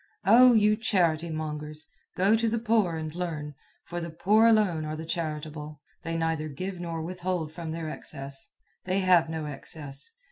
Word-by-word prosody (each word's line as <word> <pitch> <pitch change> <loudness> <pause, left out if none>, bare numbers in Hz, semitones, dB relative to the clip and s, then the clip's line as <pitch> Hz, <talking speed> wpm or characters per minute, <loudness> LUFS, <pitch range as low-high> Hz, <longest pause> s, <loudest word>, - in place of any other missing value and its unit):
Oh, 245 +5 +8
you 210 0 +4
charity 170 -7 +1
mongers! 155 0 -4 0.3
Go 195 +4 +4
to 230 0 +1
the 230 - 0
poor 220 -6 +2
and 155 -1 -4
learn, 160 -4 -4 0.3
for 175 0 -4
the 170 - -4
poor 210 +7 +4
alone 205 -8 +3
are 155 0 -3
the 160 +1 -6
charitable. 155 -2 -4 0.2
They 165 0 -3
neither 165 -1 -1
give 185 +6 -5
nor 165 -2 -4
withhold 175 -2 -3
from 165 -1 -6
their 165 0 -4
excess. 135 -2 -7 0.4
They 185 +1 +1
have 180 -3 +4
no 160 -1 -3
excess. 145 - -8
165 Hz, 170 wpm, -28 LUFS, 155-185 Hz, 0.4 s, Oh